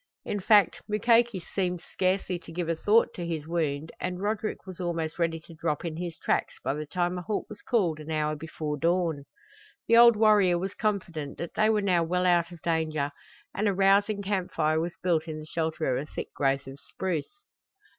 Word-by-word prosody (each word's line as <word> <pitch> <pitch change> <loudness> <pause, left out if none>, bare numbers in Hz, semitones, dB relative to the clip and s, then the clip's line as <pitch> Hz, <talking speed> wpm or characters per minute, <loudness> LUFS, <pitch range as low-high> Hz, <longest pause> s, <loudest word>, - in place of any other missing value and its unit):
In 205 - -2
fact, 205 -2 +4
Mukoki 230 0 +3
seemed 180 0 -2
scarcely 185 +1 -1
to 165 - -13
give 170 0 -3
a 165 - +1
thought 215 +7 +3
to 175 - -5
his 165 -3 -3
wound 160 -2 -2
and 180 0 -3
Roderick 215 +1 -2
was 185 -2 -9
almost 165 -2 -3
ready 165 -1 0
to 165 - -14
drop 155 0 -2
in 165 -2 -3
his 170 -1 -5
tracks - - 0
by 135 - 0
the 150 +1 -5
time 175 +3 -1
a - - -5
halt 205 +4 -2
was 210 - -10
called 180 -10 +1
an 155 +1 -9
hour 155 -1 0
before 155 -1 -4
dawn. 165 -3 +1 0.6
The 230 - +5
old 235 -1 +8
warrior 210 -5 +4
was 190 +3 -3
confident 180 -9 -2
that 170 - -5
they 215 +1 +3
were 215 -1 +2
now 180 -3 +3
well 180 +2 0
out 175 -1 +3
of 170 -2 -12
danger 155 -3 0 0.4
and 210 +2 0
a 200 - +1
rousing 200 +2 +3
camp 190 -2 -1
fire 155 0 +1
was 170 +1 -3
built 170 -3 +1
in 155 -1 -5
the 155 - -8
shelter 160 -4 -1
of - - -1
a 150 - -10
thick - - -6
growth 135 -1 0
of 135 +1 -10
spruce. 185 - -4
175 Hz, 205 wpm, -28 LUFS, 160-195 Hz, 0.6 s, old